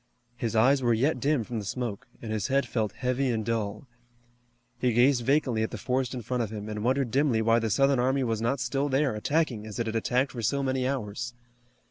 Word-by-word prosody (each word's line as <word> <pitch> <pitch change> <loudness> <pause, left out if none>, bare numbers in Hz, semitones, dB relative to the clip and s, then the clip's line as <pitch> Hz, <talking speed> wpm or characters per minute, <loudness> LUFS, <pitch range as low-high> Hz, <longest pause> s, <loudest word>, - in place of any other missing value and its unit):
His 115 -2 -3
eyes 130 +5 +4
were 120 -2 +3
yet 135 +8 +1
dim 145 -4 +1
from 115 0 -4
the - - -5
smoke, 120 +3 -4 0.2
and 110 - -5
his 110 -3 -1
head 135 +1 +2
felt 110 -4 -2
heavy 130 +1 -1
and 110 -3 -1
dull. 110 0 -2 0.9
He 125 -1 +1
gazed 120 +1 +4
vacantly 130 -3 +2
at 110 - 0
the 120 - -6
forest 130 +3 -1
in 120 - -5
front 125 +2 -1
of 110 - -2
him, 105 -1 -6
and 105 0 -4
wondered 130 0 +1
dimly 135 -3 +2
why 115 +1 +4
the 115 -1 -1
Southern 135 +4 +3
army 130 +2 +2
was 115 -3 -1
not 125 +4 0
still 135 +4 -1
there, 135 -1 +2
attacking, 120 -1 -1
as 105 - -7
it 115 - -1
had 110 0 -3
attacked 125 +4 +1
for 120 - -6
so 140 +6 0
many 130 -1 0
hours. 120 -2 -3
120 Hz, 225 wpm, -27 LUFS, 110-135 Hz, 0.9 s, eyes